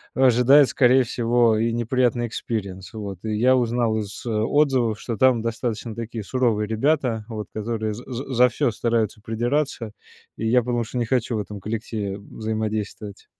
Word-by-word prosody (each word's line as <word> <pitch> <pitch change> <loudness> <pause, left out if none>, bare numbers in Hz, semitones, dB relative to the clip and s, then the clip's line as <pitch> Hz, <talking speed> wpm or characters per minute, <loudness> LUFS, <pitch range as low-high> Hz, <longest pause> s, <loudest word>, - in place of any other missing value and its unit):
ожидает, 130 +2 +5
скорее 130 +1 +4
всего, 120 -1 +2
и 115 +1 +1
неприятный 120 0 +1
experience, 100 -5 -5
вот. 100 -4 -6
И 110 -1 -2
я 125 +4 +4
узнал 120 -2 +1
из 105 +2 -7
отзывов, 120 0 +1
что 115 - -4
там 130 -2 +4
достаточно 115 -1 -3
такие 115 -1 -5
суровые 115 -2 0
ребята, 115 0 0
вот, 110 -3 -6
которые 110 0 -2
за 120 +4 -9
за 130 +2 -5
за 125 +1 +5
всё 125 +1 0
стараются 110 -1 -1
придираться, 120 +1 -2 0.5
и 115 - -2
я 125 +2 +4
потому 120 0 -1
что 125 - -6
не 120 - 0
хочу 120 -1 0
в - - -1
этом 105 0 -6
коллективе 105 -1 -4
взаимодействовать. 110 -1 -5
115 Hz, 160 wpm, -23 LUFS, 110-125 Hz, 0.5 s, ожидает